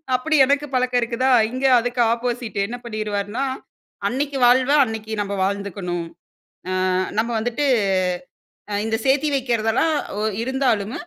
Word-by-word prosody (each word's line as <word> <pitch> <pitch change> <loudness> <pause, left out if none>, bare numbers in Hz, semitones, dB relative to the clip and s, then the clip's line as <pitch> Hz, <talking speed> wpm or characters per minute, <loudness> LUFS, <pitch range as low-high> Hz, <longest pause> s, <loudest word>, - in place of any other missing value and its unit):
அப்டி 310 +5 0
எனக்கு 285 +2 +1
பழக்கம் 250 -1 +1
இருக்குதா? 245 +3 0 0.2
இங்கே 260 +2 +1
அதுக்கு 245 +1 -1
ஆப்போசிட்டு 240 -2 -3
என்ன 245 +3 -6
பண்ணிருவாருன்னா, 215 +2 -3 0.6
அன்னைக்கி 275 +2 -2
வாழ்வ 255 +2 +4
அன்னைக்கி 220 -1 -6
நம்ம 200 0 -3
வாழ்ந்துக்கணும். 190 -3 -3 0.8
ஆ - - +1 0.3
நம்ம 230 - +1
வந்துட்டு 245 +6 -1 1.2
இந்த 225 0 0
சேர்த்தி 280 +3 +2
வைக்கிறதெல்லாம் 245 +3 +1 0.3
ஒ - - -1 0.2
இருந்தாலும். 245 -4 0
240 Hz, 120 wpm, -21 LUFS, 215-265 Hz, 1.2 s, வாழ்வ